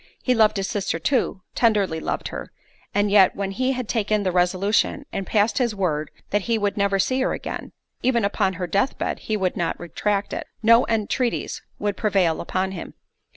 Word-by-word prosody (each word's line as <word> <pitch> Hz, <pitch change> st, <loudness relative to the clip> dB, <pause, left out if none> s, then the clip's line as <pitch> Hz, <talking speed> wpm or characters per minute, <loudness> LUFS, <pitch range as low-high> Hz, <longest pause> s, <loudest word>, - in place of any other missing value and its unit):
He 255 Hz, -, +3 dB
loved 215 Hz, -3 st, +4 dB
his 195 Hz, 0 st, -1 dB
sister 200 Hz, -7 st, -1 dB
too, 190 Hz, -, 0 dB
tenderly 205 Hz, -8 st, +2 dB
loved -, -, -3 dB
her, -, -, -7 dB, 0.4 s
and 205 Hz, 0 st, +1 dB
yet 200 Hz, -2 st, +6 dB
when 195 Hz, -1 st, -2 dB
he 255 Hz, +6 st, 0 dB
had 250 Hz, -3 st, -4 dB
taken 215 Hz, -2 st, 0 dB
the 185 Hz, -, +1 dB
resolution, 185 Hz, +9 st, +1 dB
and 195 Hz, -, -3 dB
passed 215 Hz, +3 st, +2 dB
his 235 Hz, -4 st, +1 dB
word 155 Hz, -6 st, -1 dB, 0.2 s
that 205 Hz, -, +2 dB
he 230 Hz, -, +3 dB
would 205 Hz, -2 st, 0 dB
never 200 Hz, -1 st, +2 dB
see 255 Hz, +7 st, +1 dB
her -, -, +1 dB
again—even 240 Hz, -4 st, -3 dB
upon 200 Hz, -1 st, +1 dB
her 180 Hz, 0 st, -3 dB
death 200 Hz, +9 st, 0 dB
bed -, -, -2 dB
he 215 Hz, -, -2 dB
would 185 Hz, -3 st, 0 dB
not 170 Hz, -, -2 dB
retract 200 Hz, +4 st, -2 dB
it—no 230 Hz, +2 st, +3 dB
entreaties 230 Hz, +2 st, -1 dB, 0.2 s
could 205 Hz, -1 st, -2 dB
prevail 190 Hz, -6 st, +2 dB
upon 185 Hz, +2 st, -1 dB
him. 185 Hz, -, -7 dB
205 Hz, 185 wpm, -23 LUFS, 190-225 Hz, 0.4 s, yet